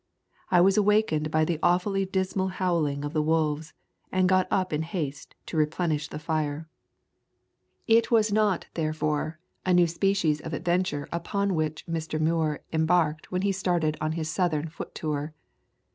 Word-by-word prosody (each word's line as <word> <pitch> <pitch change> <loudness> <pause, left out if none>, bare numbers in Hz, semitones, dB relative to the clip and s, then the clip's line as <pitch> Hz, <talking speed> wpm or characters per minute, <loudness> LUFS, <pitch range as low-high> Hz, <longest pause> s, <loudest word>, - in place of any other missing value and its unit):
I 175 - +5
was 195 +2 +4
awakened 210 -7 +2
by 155 0 +2
the 165 -1 -1
awfully 195 +2 +2
dismal 190 0 -1
howling 165 -6 -1
of 145 - -5
the 155 - +2
wolves, 155 0 0 0.4
and 185 0 +3
got 185 0 +3
up 185 -4 0
in 150 - 0
haste 160 -4 -5
to 165 - -5
replenish 155 -1 0
the - - -7
fire."' 155 0 -2 1.2
[x] 225 - +4
Introduction - - +8
It 230 - -5
was 220 -2 +4
not, 210 -4 +2
therefore, 155 0 -1 0.2
a 185 -1 +3
new 175 -1 +6
species 170 -3 +1
of - - -4
ad 170 - -7
venture 175 -4 0
upon 200 +4 -1
which 155 -2 -2
Mr. 160 -1 -3
Muir 155 -1 +1
embarked 160 -1 +1
when 185 +1 -1
he 200 - +2
started 175 -5 0
on 155 0 0
his 160 -1 -3
Southern 160 -2 0
foot 155 - -9
tour. 150 0 -3
165 Hz, 170 wpm, -27 LUFS, 155-185 Hz, 1.2 s, Introduction